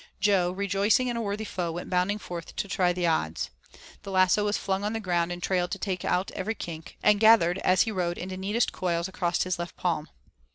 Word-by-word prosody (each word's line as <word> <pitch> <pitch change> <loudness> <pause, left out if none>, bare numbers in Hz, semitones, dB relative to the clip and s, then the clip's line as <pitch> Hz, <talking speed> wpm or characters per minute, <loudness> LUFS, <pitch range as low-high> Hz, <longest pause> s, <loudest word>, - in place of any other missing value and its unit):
Jo, 195 -3 +3
rejoicing 200 +6 +1
in 240 - -2
a - - -1
worthy 210 0 -3
foe, 175 -4 -3
went 175 - -5
bounding 185 +3 +1
forth 175 -5 -8
to - - -2
try 185 -3 +2
the 175 0 -1
odds. 80 - 0 0.5
The 200 - -9
lasso 185 +2 +3
was 205 0 +1
flung 195 0 -2
on 210 +1 -1
the 225 - -2
ground 175 -4 0
and 175 0 -6
trailed 180 -2 +1
to - - -3
take 185 -4 -3
out 185 +2 0
every 215 +4 -3
kink, 165 -4 -8
and 210 -1 +5
gathered 210 -5 +5
as 185 -1 +4
he 225 - -3
rode 175 -3 -1
into 185 +1 -5
neatest 205 +5 0
coils 170 -1 -1
across 175 -2 0
his 185 -1 -2
left 170 0 -5
palm. 160 -4 -1
185 Hz, 220 wpm, -27 LUFS, 175-205 Hz, 0.5 s, and